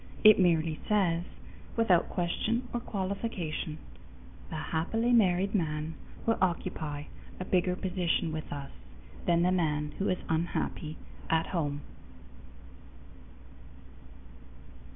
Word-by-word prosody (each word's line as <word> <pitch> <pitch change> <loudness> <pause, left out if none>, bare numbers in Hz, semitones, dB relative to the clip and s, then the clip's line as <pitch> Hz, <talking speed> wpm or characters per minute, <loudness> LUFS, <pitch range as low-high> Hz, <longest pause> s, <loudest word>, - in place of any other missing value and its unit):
It 215 -1 +9
merely 165 -3 +3
says, 180 -5 +2 0.5
without 195 -7 +4
question 220 +8 0
or 240 - 0
qualification, 190 -7 -3 0.7
the - - -5
happily 170 +10 0
married 195 -3 +4
man 155 -4 0 0.3
will 225 - +2
occupy 155 -5 -1 0.4
a 185 - -3
bigger 180 -1 +2
position 180 -3 0
with 155 0 -5
us 140 -1 -5 0.6
than 170 0 +4
the 180 - +4
man 150 -4 +1
who 195 - +1
is 185 - +2
unhappy 160 -1 -1 0.3
at 160 0 +3
home. 145 -4 -1
175 Hz, 105 wpm, -30 LUFS, 160-195 Hz, 0.7 s, It